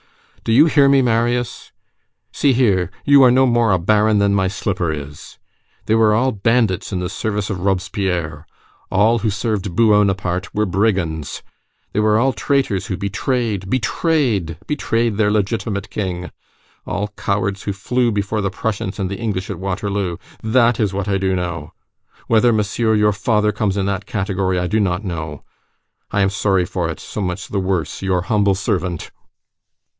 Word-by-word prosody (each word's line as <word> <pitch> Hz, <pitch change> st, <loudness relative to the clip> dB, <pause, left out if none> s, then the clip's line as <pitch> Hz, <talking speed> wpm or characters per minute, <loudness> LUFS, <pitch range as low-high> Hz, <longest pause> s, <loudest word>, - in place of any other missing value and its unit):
Do -, -, -1 dB
you 135 Hz, +7 st, +7 dB
hear 145 Hz, -3 st, +4 dB
me, 135 Hz, -1 st, +4 dB
Marius! 120 Hz, +1 st, -1 dB, 0.6 s
See 140 Hz, -2 st, +2 dB
here, 100 Hz, -9 st, +2 dB, 0.2 s
you 140 Hz, -1 st, +7 dB
are 130 Hz, -, +7 dB
no 130 Hz, +2 st, +4 dB
more 120 Hz, -3 st, +3 dB
a 95 Hz, -, +4 dB
baron 105 Hz, +4 st, +2 dB
than 100 Hz, 0 st, +2 dB
my 95 Hz, -1 st, +2 dB
slipper 95 Hz, -3 st, -2 dB
is! 75 Hz, -1 st, -8 dB, 0.5 s
They 110 Hz, -, +1 dB
were 110 Hz, -1 st, +4 dB
all 130 Hz, +4 st, +2 dB
bandits 110 Hz, -2 st, +1 dB
in 95 Hz, -, -2 dB
the 90 Hz, -1 st, -3 dB
service 105 Hz, -1 st, -3 dB
of 95 Hz, -, -3 dB
Robespierre! 90 Hz, -4 st, -2 dB, 0.4 s
All 110 Hz, +4 st, +3 dB
who 110 Hz, +1 st, 0 dB
served 100 Hz, -3 st, -2 dB
B 115 Hz, -, +4 dB
u 110 Hz, -2 st, +5 dB
o 105 Hz, 0 st, +5 dB
naparté 95 Hz, -2 st, -1 dB
were 105 Hz, 0 st, +2 dB
brigands! 90 Hz, -6 st, -1 dB, 0.5 s
They 105 Hz, -, 0 dB
were 105 Hz, 0 st, +3 dB
all 130 Hz, +3 st, +2 dB
traitors 105 Hz, -2 st, 0 dB
who 95 Hz, -, -3 dB
betrayed, 100 Hz, 0 st, -2 dB
betrayed, 120 Hz, -, 0 dB
betrayed 115 Hz, -7 st, 0 dB
their 105 Hz, -1 st, +3 dB
legitimate 105 Hz, 0 st, -1 dB
king! 90 Hz, -3 st, -4 dB, 0.6 s
All 100 Hz, +2 st, -2 dB
cowards 100 Hz, 0 st, -2 dB
who 100 Hz, -, -2 dB
fled 120 Hz, +4 st, 0 dB
before 105 Hz, +1 st, -1 dB
the 100 Hz, -, 0 dB
Prussians 95 Hz, 0 st, -3 dB
and 95 Hz, -2 st, -2 dB
the 100 Hz, -, -5 dB
English 100 Hz, -5 st, -3 dB
at -, -, -6 dB
Waterloo! 95 Hz, -1 st, -2 dB, 0.2 s
That 115 Hz, +1 st, +3 dB
is 105 Hz, -4 st, +1 dB
what 100 Hz, 0 st, -3 dB
I 100 Hz, -1 st, +1 dB
do 95 Hz, -1 st, 0 dB
know! 85 Hz, -4 st, -4 dB, 0.5 s
Whether 115 Hz, +1 st, +4 dB
Monsieur 110 Hz, +1 st, +1 dB
your 105 Hz, 0 st, +3 dB
father 105 Hz, 0 st, +1 dB
comes 105 Hz, -1 st, -1 dB
in 95 Hz, -, 0 dB
that 100 Hz, +1 st, -2 dB
category, 95 Hz, -2 st, -1 dB
I 90 Hz, -, 0 dB
do 110 Hz, +5 st, +1 dB
not 95 Hz, 0 st, 0 dB
know! 80 Hz, -5 st, -5 dB, 0.7 s
I 100 Hz, -, 0 dB
am 95 Hz, 0 st, +2 dB
sorry 95 Hz, -3 st, +1 dB
for 90 Hz, -3 st, -2 dB
it, 80 Hz, -, -5 dB
so 105 Hz, -, -6 dB
much 90 Hz, +1 st, -3 dB
the 100 Hz, -, -1 dB
worse, 95 Hz, -3 st, -2 dB
your 95 Hz, -2 st, 0 dB
humble 100 Hz, 0 st, +2 dB
servant!" 90 Hz, -4 st, -2 dB
100 Hz, 175 wpm, -19 LUFS, 95-110 Hz, 0.7 s, you